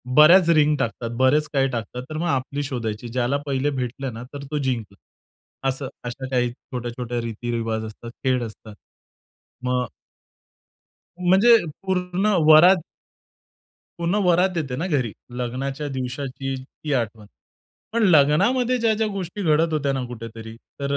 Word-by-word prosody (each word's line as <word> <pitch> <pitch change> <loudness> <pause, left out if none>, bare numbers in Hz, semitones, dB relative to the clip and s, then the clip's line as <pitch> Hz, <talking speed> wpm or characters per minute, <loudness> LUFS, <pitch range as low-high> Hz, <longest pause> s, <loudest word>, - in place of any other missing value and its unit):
बऱ्याच 170 +3 +7
रिंग 150 0 +4
टाकतात, 115 -1 -2
बरेच 145 +4 +3
काही 135 -1 +3
टाकतात, 120 +1 -4
तर 155 - -4
मग 175 - -1
आपली 140 0 -1
शोधायची. 120 -4 -4
ज्याला 125 +3 0
पहिले 140 0 0
भेटलं 125 +1 -4
ना, 115 +2 -7
तर 140 -1 -6
तो 150 - -1
जिंकला. 120 -8 -2 0.7
असं, 135 0 -3 0.2
अशा 120 +2 -5
काही 125 -1 +1
छोट्या-छोट्या 120 -1 -5
रीती-रिवाज 115 -1 -3
असतात, 110 +2 -9
खेळ 130 -2 +1
असतात. 110 -1 -13 0.9
मग 125 -1 0 1.3
म्हणजे 190 +6 +6 0.3
पूर्ण 185 0 -1 0.2
वरात 170 +3 +8 1.2
पूर्ण 170 +4 0
वरात 180 +1 +3
येते 140 -6 -2
ना 165 +8 -2
घरी. 130 - 0 0.3
लग्नाच्या 135 +4 -3
दिवसाची 135 +1 -4
ती 150 +1 -5
आठवण. 110 -4 -2 0.7
पण 235 - +2
लग्नामध्ये 200 - +4
ज्या-ज्या 220 -1 +2
गोष्टी 195 +1 -5
घडत 160 0 +2
होत्या 140 -2 0
ना, 130 - -2
कुठेतरी 115 -1 -8 0.2
तर 140 0 -2
135 Hz, 135 wpm, -23 LUFS, 120-160 Hz, 1.3 s, वरात